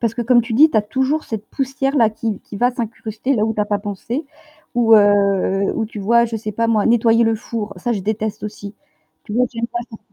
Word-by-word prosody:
Parce 230 -1 0
que 240 - -2
comme 240 0 +4
tu 230 +1 -6
dis, 295 +8 +6
tu - - -1
as 215 - +4
toujours 265 +8 -1
cette 215 -2 -6
poussière-là 270 -3 0
qui 220 -1 -4
qui 205 - -10
va 245 +4 +2
s'incruster 230 +1 -3
là 215 -3 +1
où 220 0 -1
tu 210 - -1
as 210 - +2
pas 205 0 -1
pensé, 210 - -5 0.5
ou, 230 -2 +5
heu, 200 -2 +3
ou 220 - -1
tu 215 - -9
vois 235 +4 +4
je 230 -1 -4
sais 215 -1 -5
pas 230 +3 0
moi 220 -2 +2
nettoyer 230 0 +4
le 225 0 +2
four, 220 -1 -5
ça 235 +7 -2
je 210 - -2
déteste 215 +1 -3
aussi. 205 -1 -7 0.5
Tu - - -8
vois 250 +3 +3
j'aime 230 0 -2
pas 240 - -4
faire 220 - -11
225 Hz, 245 wpm, -19 LUFS, 210-235 Hz, 0.5 s, dis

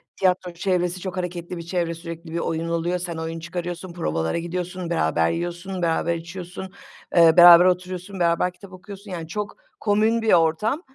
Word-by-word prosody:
tiyatro 180 -1 0
çevresi 180 0 -1
çok 185 0 -6
hareketli 175 -1 -4
bir - - -5
çevre; 170 -1 -1
sürekli 165 0 -9
bir 170 - -1
oyun 165 0 -2
oluyor, 170 +2 -1
sen 170 -2 -4
oyun 165 0 -4
çıkarıyorsun, 175 +1 -5
provalara 80 - -1
gidiyorsun, 180 +1 -4
beraber 80 - +1
yiyorsun, 175 +2 -4
beraber 170 0 +1
içiyorsun, 180 +2 -8 0.4
eee, 165 -1 +6
beraber 175 0 +10
oturuyorsun, 185 +1 -1
beraber 170 +1 +2
kitap 190 +1 -14
okuyorsun, 200 +1 -11
yani, 165 -2 -5
çok 210 - -5 0.2
komün 220 +2 +2
bir 225 - +3
ortam. 175 - +2
175 Hz, 165 wpm, -23 LUFS, 170-185 Hz, 0.4 s, beraber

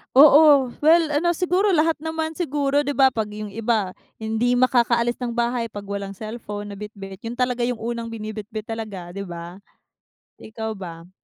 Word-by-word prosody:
Oo, 285 -1 +8
well 320 +1 +4
ano 320 +4 +2
siguro 370 +3 +1
lahat 325 0 +3
naman 320 +1 -4
siguro 290 -3 0
di 285 - -1
ba, 270 -1 +5
'pag 225 -4 -2
yung 210 0 -6
iba, 220 -1 0 0.3
hindi 225 +3 +1
makakaalis 240 -1 +2
ng 245 -2 -3
bahay 235 0 0
'pag 205 -3 -7
walang 200 -1 -4
cellphone 210 0 -7
na 200 - -8
bitbit 195 -2 -8
yun 230 - -3
talaga 250 -1 0
yung 245 -2 -3
unang 230 0 -4
binibitbit 215 0 -6
talaga, 215 -5 -6
di 200 +3 -6
ba? 175 0 -8 0.8
Ikaw 220 -1 -6
ba? 170 -2 -9
235 Hz, 165 wpm, -23 LUFS, 210-280 Hz, 0.8 s, Oo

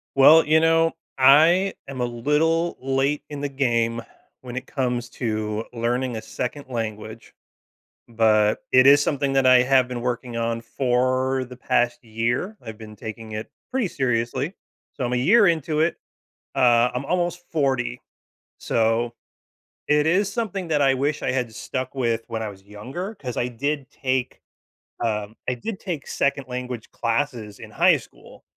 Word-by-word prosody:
Well, 155 +4 +7
you 155 +1 +4
know, 165 0 +3 0.3
I 160 +9 +6
am 135 -2 -5
a - - +2
little 150 +8 0
late 135 +2 0
in 145 -1 -6
the 145 - -1
game 115 -4 0 0.4
when 125 -1 -8
it 130 - -5
comes 125 -3 -2
to 110 -2 -2
learning 120 +1 -1
a 110 - -5
second 140 +3 -5
language, 110 -1 -5 0.8
but 110 -2 +3
it 130 0 +7
is 145 +1 +8
something 140 -1 0
that 135 -1 +3
I 130 -1 +7
have 130 0 +3
been 125 -1 -5
working 120 0 -3
on 115 0 -1
for, 130 +2 0
the 125 0 -11
past 120 0 0
year. 120 - -2
I've 110 -2 -9
been 110 -1 -11
taking 110 +1 -8
it 110 +1 -5 0.2
pretty 260 -5 0
seriously, 130 +2 -1 0.4
so 130 - -3
I'm 120 - -2
a - - +2
year 200 - +5
into 160 -2 0
it, 160 +2 +2 0.6
uh, 120 -2 +4
I'm 125 +2 -3
almost 175 +2 -1
40, 130 -5 0 0.6
so 115 +1 0 0.8
it 150 0 +3
is 195 +4 +2
something 200 -6 -3
that 150 -2 +1
I 135 -1 +4
wish 145 +3 -1
I - - +1
had 125 -3 -2
stuck 130 +4 -5
with 115 -3 0
when 115 -1 -3
I 110 - -3
was 95 -2 -11
younger, 130 - -7
'cause 125 -8 -6
I 120 - 0
did 140 +3 -3
take, 130 -2 -2 0.6
um 105 -1 -2
I - - +2
did 190 - -6
take 170 -7 -5
second 140 -1 -1
language 125 -2 -5
classes 115 -3 -2
in - - -11
high - - +4
school, - - -16
130 Hz, 165 wpm, -23 LUFS, 115-145 Hz, 0.8 s, is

